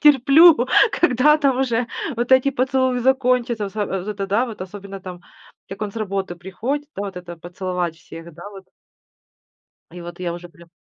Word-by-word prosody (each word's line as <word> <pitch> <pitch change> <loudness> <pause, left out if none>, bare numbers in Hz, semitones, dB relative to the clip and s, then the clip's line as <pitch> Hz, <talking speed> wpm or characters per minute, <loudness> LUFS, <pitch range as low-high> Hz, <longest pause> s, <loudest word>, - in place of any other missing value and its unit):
терплю, 290 0 +6 0.2
когда 300 -1 +3
там 275 -4 +1
уже 245 -2 0 0.3
вот 240 +2 -2
эти 260 +1 +5
поцелуи 260 -1 +1
закончатся. 250 -3 +1
Вот 195 - -7
с - - -18
вот 195 -1 -3
это 200 -2 -3
да, 210 +5 +2
особенно 195 +1 -8
там, 180 -1 -9 0.5
как 195 +2 -7
он 210 - -3
с - - -13
работы 195 -4 -3
приходит, 235 +12 -4
да, 200 - -3
вот 195 -2 -7
это 175 -1 -8
поцеловать 175 0 -4
всех, 165 0 -12
да, 175 +5 -10
вот. 195 -2 -12 1.3
И 175 - -9
вот 175 0 -10
я 175 -2 -3
уже 175 0 -9
прям 170 -1 -19
205 Hz, 175 wpm, -21 LUFS, 180-255 Hz, 1.3 s, терплю